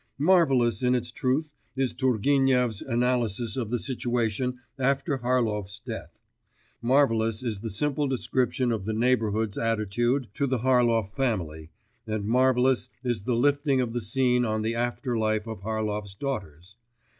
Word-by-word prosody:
Marvellous 135 -8 +3
in 125 0 +3
its 120 -1 -2
truth 140 +6 -1 0.2
is 130 -2 0
Turgenev's 130 -2 +2
analysis 120 -2 0
of 120 -5 -3
the 120 - 0
situation 125 -1 -1 0.2
after 135 +1 0
Harlov's 110 -5 -1
death, 115 -1 -8 0.6
marvellous 115 -3 +2
is 110 -5 -3
the 115 +2 -5
simple 145 +7 -1
description 130 -1 0
of 110 -4 -2
the 110 - -2
neighbourhood's 110 -3 +1
attitude 115 +3 0
to 140 - 0
the 130 0 0
Harlov 120 -4 +2
family, 85 - -2 0.4
and 110 -2 -2
marvellous 125 +2 +2
is 120 -4 -1
the 125 - +1
lifting 140 +2 +2
of 120 -3 -1
the 120 - -2
scene 125 +3 +2
on 110 -2 -1
the 115 +1 0
after 120 +1 -2
life 110 -1 0
of 110 -4 -7
Harlov's 105 -2 -3
daughters. 100 - -6
120 Hz, 145 wpm, -26 LUFS, 110-130 Hz, 0.6 s, Marvellous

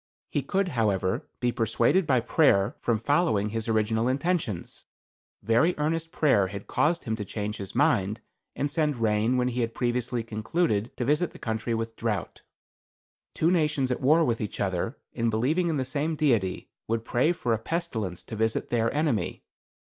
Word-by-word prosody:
"He - - 0
could, 195 -1 0
however, 100 - 0
be 125 -1 +1
persuaded 120 - +2
by 130 -4 +3
prayer 115 -6 +3
from 115 -2 +1
following 130 - +1
his 115 +1 -4
original 110 +1 +1
intentions. 135 - -2 0.6
Very 125 +11 +3
earnest 165 +2 -1
prayer 115 -11 +3
had 100 +1 -7
caused 165 +3 +1
him 110 - -2
to 105 - -3
change 105 +2 -4
his 100 -1 -7
mind, 100 +4 +2 0.4
and 145 0 -1
send 150 -3 0
rain 110 +2 +2
when 125 0 +1
he 125 0 -2
had 115 -1 -2
previously 120 -1 -1
concluded 110 +1 -1
to 125 - -1
visit 150 +6 +1
the - - -11
country 110 +1 -2
with 115 0 -4
drouth. 110 -3 -3 1.0
"Two 165 +2 +2
nations 150 -6 +1
at 125 - -2
war 155 +5 +4
with 115 -4 0
each 105 - -4
other, 95 +5 -1 0.2
and 115 -1 0
believing 140 +11 +1
in 160 -3 0
the 130 - -1
same 145 +5 -1
Deity, 115 -12 0 0.2
would 115 0 -1
pray 130 +9 +2
for 125 -9 -1
a 110 - 0
pestilence 115 - -3
to 110 - -7
visit 110 +1 -1
their 115 -1 +2
enemy. 145 -6 -1
120 Hz, 175 wpm, -27 LUFS, 110-150 Hz, 1.0 s, war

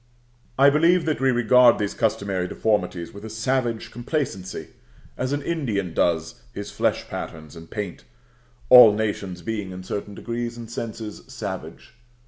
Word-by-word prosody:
I 140 +1 +7
believe 165 +3 +4
that 155 -2 0
we 135 - +4
regard 120 0 +5
these 100 -1 -2
customary 100 -4 -1
deformities 90 -5 -1
with 100 - -10
a 110 - -6
savage 115 +1 -1
complacency, 120 - -4 0.5
as 130 +1 -2
an 145 0 -1
Indian 110 - -2
does 85 +7 0
his 100 0 -6
flesh - - 0
patterns 80 -1 -7
and 80 0 -11
paint 105 -5 -5 0.7
(all 125 -4 +10
nations 100 -5 -3
being 105 -1 -3
in 95 0 -8
certain 100 +2 -5
degrees 120 +1 -4
and 115 -1 -9
senses 110 -2 -6
savage). 100 -7 -7
110 Hz, 145 wpm, -24 LUFS, 95-125 Hz, 0.7 s, all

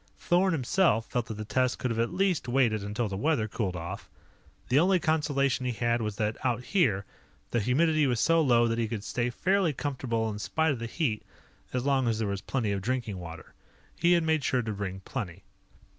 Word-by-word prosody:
Thorn 185 +2 +2
himself 135 - +2
felt 120 -1 -1
that 110 - -5
the 110 +1 -6
test 130 +3 +1
could 125 - -2
have 115 - -2
at 115 - +1
least 185 -5 0
waited 120 -5 +2
until 105 +3 -2
the 100 - -4
weather 115 0 +1
cooled 100 -4 -2
off. 90 +3 -6 0.6
The 130 +3 +5
only 185 +2 +4
consolation 140 -5 +1
he 125 - -1
had 120 +1 0
was 105 -2 -2
that, 105 0 -2
out 125 -1 0
here, 115 - +1 0.5
the 120 - +2
humidity 150 +6 +2
was 120 -3 0
so 165 +5 +4
low 120 -5 +4
that 115 0 -1
he 115 - +1
could 105 -2 -4
stay 120 +2 -1
fairly 185 +5 +1
comfortable 125 -5 -2
in 105 - -6
spite 160 +9 +1
of 130 - -3
the 115 - -4
heat 115 -5 -1 0.5
as 125 0 -2
long 135 -3 +2
as 115 -2 +1
there 110 -1 -1
was 100 -1 -3
plenty 115 -6 -1
of 100 -1 -1
drinking 115 -3 -2
water. 80 -2 -9 0.4
He 175 +1 +3
had 170 -1 +3
made 160 -2 +1
sure 125 -1 +1
to 110 -1 -3
bring 95 -2 -5
plenty. 100 -4 -6
120 Hz, 215 wpm, -28 LUFS, 110-145 Hz, 0.6 s, The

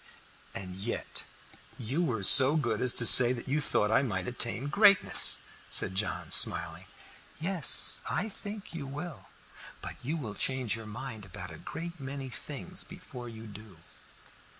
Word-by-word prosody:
"And 90 -1 -8
yet 105 +5 -7 0.6
you 130 +8 -4
were 120 - -4
so 135 +8 +9
good 120 -8 -3
as 125 - +1
to 120 - +1
say 120 +2 +7
that 120 - -10
you 145 +3 -2
thought 105 -6 -1
I 115 - +2
might 95 -9 -5
attain 120 +1 -4
greatness," 200 +4 +5 0.3
said - - +1
John, 100 +2 -5
smiling. - - +3 0.5
"Yes, 170 -2 +1
I 215 - -4
think 205 -1 -11
you 145 -5 -8
will. 150 +4 -10 0.5
But - - -10
you 150 +7 -5
will 115 -9 -8
change 130 -1 -3
your 115 -1 -11
mind 110 0 -10
about 95 -2 -11
a 80 - -14
great 170 0 -10
many 135 0 -9
things 150 +8 -8
before 155 -9 -13
you 110 -1 -13
do." 105 -3 -15
130 Hz, 155 wpm, -27 LUFS, 110-155 Hz, 0.6 s, so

